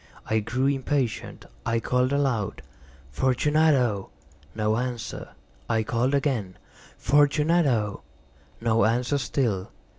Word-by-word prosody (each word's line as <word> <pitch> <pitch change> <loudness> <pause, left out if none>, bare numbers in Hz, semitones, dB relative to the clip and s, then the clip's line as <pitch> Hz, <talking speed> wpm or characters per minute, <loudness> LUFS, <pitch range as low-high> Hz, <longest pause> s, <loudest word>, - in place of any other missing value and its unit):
I 110 - +1
grew 120 +5 -1
impatient. 135 -3 -1 0.2
I 115 0 0
called 125 +2 +1
aloud— 135 -8 -1 0.5
"Fortunato!" 130 - +2 0.5
No 110 0 +1
answer. 120 -4 -4 0.4
I 110 -1 +2
called 120 +5 0
again— 125 -10 -1 0.4
"Fortunato!" 145 -5 +2 0.6
No 115 -3 +2
answer 125 +5 +1
still. 110 -6 -1
125 Hz, 95 wpm, -25 LUFS, 110-140 Hz, 0.6 s, Fortunato